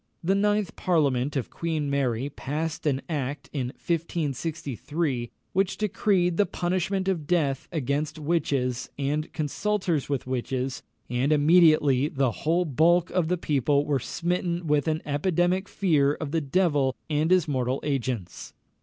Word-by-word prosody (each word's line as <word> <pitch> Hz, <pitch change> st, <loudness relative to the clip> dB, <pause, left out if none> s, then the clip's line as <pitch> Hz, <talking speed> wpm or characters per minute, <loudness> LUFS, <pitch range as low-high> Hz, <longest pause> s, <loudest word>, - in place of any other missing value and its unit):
The 185 Hz, +4 st, +2 dB
ninth 205 Hz, 0 st, +1 dB
parliament 145 Hz, -6 st, +1 dB
of 130 Hz, -5 st, -2 dB
Queen 160 Hz, -3 st, -2 dB
Mary 135 Hz, -3 st, 0 dB
passed 155 Hz, +4 st, -3 dB
an 135 Hz, -2 st, 0 dB
act 145 Hz, -3 st, -4 dB
in 130 Hz, -4 st, -1 dB
1563, 150 Hz, -3 st, -2 dB, 0.2 s
which 195 Hz, 0 st, +1 dB
decreed 190 Hz, -4 st, +1 dB
the 205 Hz, -, +3 dB
punishment 185 Hz, +2 st, -1 dB
of 170 Hz, -6 st, -1 dB
death 145 Hz, -6 st, +1 dB
against 150 Hz, 0 st, -1 dB
witches 140 Hz, -6 st, -1 dB
and 145 Hz, +3 st, -1 dB
consulters 170 Hz, 0 st, -1 dB
with 140 Hz, -3 st, -1 dB
witches, 130 Hz, 0 st, -2 dB, 0.3 s
and 125 Hz, +4 st, 0 dB
immediately 150 Hz, -3 st, +5 dB
the 135 Hz, -4 st, 0 dB
whole 170 Hz, +9 st, 0 dB
bulk 165 Hz, +4 st, +3 dB
of 180 Hz, -3 st, +1 dB
the 180 Hz, +2 st, +1 dB
people 145 Hz, -2 st, +1 dB
were 145 Hz, -2 st, +1 dB
smitten 175 Hz, +4 st, -2 dB
with 150 Hz, -1 st, +1 dB
an 155 Hz, 0 st, 0 dB
epidemic 175 Hz, +5 st, +1 dB
fear 150 Hz, -7 st, +2 dB
of 150 Hz, -2 st, -5 dB
the 165 Hz, 0 st, +1 dB
devil 145 Hz, -4 st, +1 dB
and 155 Hz, +1 st, +1 dB
his 185 Hz, -3 st, +4 dB
mortal 130 Hz, -2 st, 0 dB
agents. 125 Hz, -10 st, -3 dB
150 Hz, 140 wpm, -26 LUFS, 135-175 Hz, 0.3 s, immediately